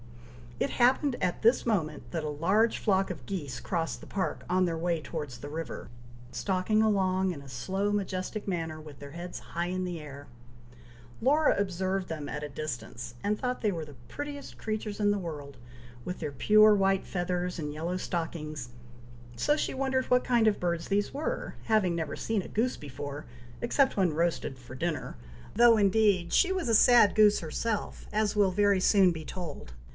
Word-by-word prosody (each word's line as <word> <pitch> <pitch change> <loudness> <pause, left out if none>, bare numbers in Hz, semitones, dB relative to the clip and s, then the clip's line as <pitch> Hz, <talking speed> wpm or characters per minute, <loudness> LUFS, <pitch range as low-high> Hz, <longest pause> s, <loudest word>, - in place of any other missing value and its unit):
It - - 0
happened 260 +2 +3
at 180 - 0
this 230 +3 +4
moment, 155 - -1
that 165 -2 -2
a 150 - -2
large 190 +10 +2
flock 195 -2 +1
of 150 -9 -7
geese 145 -9 -4
crossed 165 +7 -2
the - - -10
park, 190 -1 -2
on 185 +1 +3
their 165 -2 -1
way 170 0 0
towards 150 -6 -5
the 145 - -7
river, 155 -8 -6 0.4
stalking 185 - +1
along 190 -3 +2
in 150 -5 -7
a 140 - -12
slow 190 +11 -1
majestic 200 +1 -3
manner, 165 -4 -2
with 150 -3 -12
their 140 0 -9
heads 175 +3 -7
high 170 +1 -4
in 185 +1 -2
the 175 -2 -4
air. 145 -1 -10 0.9
Laura 295 +5 +4
observed 190 -1 -1
them 155 -3 -4
at 150 - -4
a 150 - -4
distance, 120 -5 -6
and 210 +1 +1
thought 250 0 -2
they 210 - +2
were 165 -4 -4
the 145 -2 -13
prettiest 290 -1 -7
creatures 215 -1 -4
in 205 -1 +3
the 205 - +1
world, 145 -6 -7 0.5
with 180 - -5
their 150 -3 -3
pure 215 +9 +6
white 195 -1 +2
feathers 180 0 -2
and 150 -3 -4
yellow 170 +4 -2
stockings, 155 -7 -4 0.7
so 295 - +2
she - - -1
wondered 265 -1 0
what 250 0 +3
kind 235 -3 +3
of 210 - +2
birds 170 -2 -1
these 205 +1 0
were, 315 - -3
having 210 -6 +2
never 160 -3 -3
seen 220 -3 -1
a - - -9
goose 245 +4 0
before, 145 +1 -7 0.4
except 265 +2 +2
when 185 -5 +3
roasted 165 -4 -1
for 125 0 -12
dinner, 155 -1 -3 0.4
though, 235 0 +7
indeed, 200 -4 +3
she 380 - +4
was 370 -9 -1
a 225 - +4
sad 235 -2 +6
goose 210 -1 +6
herself, 210 +7 -3
as 215 0 +1
will 200 -2 +4
very 200 0 +3
soon 190 -1 +5
be 160 -2 -6
told. 150 - -7
185 Hz, 185 wpm, -29 LUFS, 155-215 Hz, 0.9 s, though